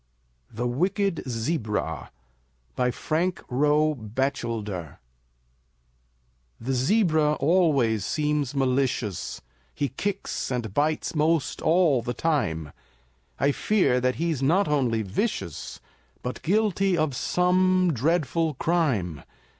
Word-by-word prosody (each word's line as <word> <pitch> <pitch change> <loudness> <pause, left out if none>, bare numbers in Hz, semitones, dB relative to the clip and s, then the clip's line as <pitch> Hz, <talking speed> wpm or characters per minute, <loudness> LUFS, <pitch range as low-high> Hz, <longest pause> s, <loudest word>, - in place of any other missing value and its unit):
THE 115 +3 -3
WICKED 180 - 0
ZEBRA 110 - -2 0.7
BY 125 - +1
FRANK 165 +8 -1
ROE 150 +4 +3
BATCHELDER 110 - -3 1.6
The 130 +4 -2
zebra 155 - +3
always 140 - +2
seems 150 +3 -1
malicious, 130 -6 -1 0.3
He 140 - -1
kicks 195 +8 -3
and 120 -5 -3
bites 150 +5 0
'most 155 -1 +1
all 160 -6 +3
the 120 +1 -4
time; 80 - -1 0.7
I 140 +1 +3
fear 160 -7 +2
that 125 0 +1
he's 165 -4 -1
not 175 +9 +3
only 125 -7 +1
vicious, 95 - -3 0.4
But 125 - -4
guilty 195 -1 +2
of 155 -4 0
some 185 +2 +2
dreadful 155 +3 0
crime. 125 - 0
145 Hz, 100 wpm, -26 LUFS, 120-170 Hz, 1.6 s, ROE